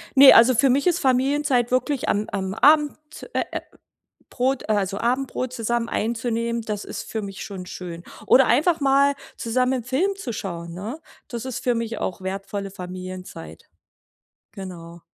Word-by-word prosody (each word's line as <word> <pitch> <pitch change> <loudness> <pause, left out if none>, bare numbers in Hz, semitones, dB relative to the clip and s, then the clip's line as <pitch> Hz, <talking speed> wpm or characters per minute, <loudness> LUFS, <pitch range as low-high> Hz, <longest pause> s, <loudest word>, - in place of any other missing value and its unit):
Ne, 275 0 +10
also, 240 +2 +7
für 270 +4 +4
mich 275 +7 +2
ist 355 0 +3
Familienzeit 265 -1 +2
wirklich 255 +2 0
am 210 +1 0
am 190 -1 -2
Abend, 295 +5 +4 0.4
äh, - - +1
äh, - - -3 0.7
Brot 260 -1 -1
also, 200 -2 0
Abendbrot 255 +1 -1
zusammen 235 -1 -1
einzunehmen, 230 +1 -1
das 210 -2 -4
ist - - -6
für 220 - -2
mich 195 -1 -7
schon 190 -3 -7
schön. 175 -2 -8 0.2
Oder 265 +1 +6
einfach 310 +6 +3
mal 280 +1 +4 0.2
zusammen 250 +2 0
'n - - -24
Film 305 - 0
zu 285 -11 -5
schauen, 170 -5 -5
ne? 215 - -6 0.3
Das 235 -1 -5
ist 260 -2 -4
für 245 -1 +2
mich 230 -1 -3
auch 185 - -3
wertvolle 195 +1 -4
Familienzeit. 185 - -8 0.8
Genau. 170 -3 -9
235 Hz, 160 wpm, -23 LUFS, 195-265 Hz, 0.8 s, Ne